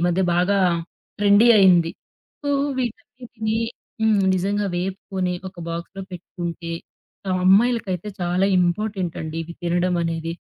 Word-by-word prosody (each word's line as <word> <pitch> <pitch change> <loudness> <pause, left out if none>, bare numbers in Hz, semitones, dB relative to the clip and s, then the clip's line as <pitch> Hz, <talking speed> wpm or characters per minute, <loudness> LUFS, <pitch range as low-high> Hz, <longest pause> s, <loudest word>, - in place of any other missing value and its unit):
మధ్య 180 +2 +1
బాగా 195 +3 +2 0.6
ట్రెండీ 205 +3 +6
అయింది. 175 -4 +5 0.5
సో 285 - -1 0.3
వీటన్నిటిని 225 -1 -4 0.4
హ్మ్, 215 -3 +3
నిజంగా 200 +2 0
వేపుకొని 185 0 -2 0.2
ఒక 185 - -18
బాక్స్‌లో 170 +3 -5
పెట్టుకుంటే, 170 -1 -6 0.7
అమ్మాయిలకైతే 205 -2 +3
చాలా 180 +2 +1
ఇంపార్టెంటండి 175 -3 -1
ఇవి 170 +1 -8
తినడం 175 +1 +1
అనేది. 165 0 -2
185 Hz, 105 wpm, -22 LUFS, 175-210 Hz, 0.7 s, ట్రెండీ